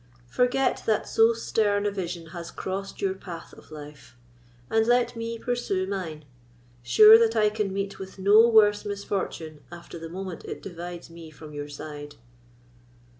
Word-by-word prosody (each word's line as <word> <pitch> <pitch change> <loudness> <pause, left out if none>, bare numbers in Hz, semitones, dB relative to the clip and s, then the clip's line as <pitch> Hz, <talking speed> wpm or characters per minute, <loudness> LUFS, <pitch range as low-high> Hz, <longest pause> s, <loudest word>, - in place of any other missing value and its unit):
Forget 255 +2 +1
that 220 -2 +1
so 225 +1 +4
stern 210 -3 0
a 205 - +1
vision 175 -4 -5
has 170 -1 -7
crossed 195 +1 -5
your 190 -1 +1
path 180 -3 -10
of - - -16
life; 145 -6 -12 0.5
and 220 - +1
let 240 0 +2
me 230 0 -4
pursue 230 -6 -2
mine, 175 -6 -5 0.6
sure 215 - +8
that 230 0 +2
I 210 -1 +3
can 210 -2 -2
meet 195 +1 -4
with 190 0 -9
no 205 +4 +6
worse 210 -2 +5
misfortune 195 -6 -4
after 175 -1 -10
the 165 0 -8
moment 185 -1 -6
it - - -7
divides 175 -2 -8
me 165 -1 -11
from 155 0 -12
your 145 0 -6
side." 145 0 -8
195 Hz, 160 wpm, -26 LUFS, 165-215 Hz, 0.6 s, sure